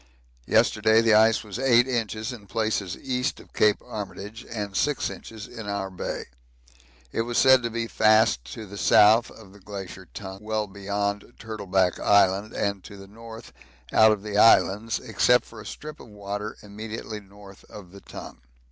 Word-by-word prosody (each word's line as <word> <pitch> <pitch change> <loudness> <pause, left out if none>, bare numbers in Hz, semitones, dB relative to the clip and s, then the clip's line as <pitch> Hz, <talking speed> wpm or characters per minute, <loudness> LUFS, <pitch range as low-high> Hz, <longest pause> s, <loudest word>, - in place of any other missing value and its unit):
Yesterday 110 +1 +3
the 115 -1 +3
ice 110 +1 +4
was 105 +1 -7
8 125 -2 +4
inches 115 -1 -2
in 105 -4 -12
places 110 -5 -2
east 130 +1 -2
of - - -17
Cape 105 -1 +3
Armitage 105 +2 -7
and 105 -3 -5
6 145 +5 0
inches 110 -2 -10
in 110 -3 -9
our 95 -1 -3
Bay: 90 - -5 0.9
it - - -1
was 120 +1 -3
said 130 -1 +6
to 115 - -2
be 115 0 -3
fast 110 - +3
to 110 - -8
the 100 0 -9
south 110 +3 +5
of 100 -4 -15
the 100 - -16
Glacier 95 -2 -9
Tongue 95 -1 -8
well 110 0 -2
beyond 100 +1 -3
Turtleback 95 -5 -1
Island 100 +1 +3
and 100 -2 -2
to 100 - -11
the 100 - -11
north 115 +2 -12 0.4
out 110 0 +6
of 105 -2 -2
the 105 -1 -1
Islands, 110 +1 +4
except 125 0 +2
for 110 -1 -12
a - - -10
strip 155 0 -9
of - - -13
water 105 0 -6
immediately 110 +1 -7
north 100 0 -16
of 95 -4 -12
the 100 0 -13
Tongue. - - -10
105 Hz, 175 wpm, -25 LUFS, 100-115 Hz, 0.9 s, said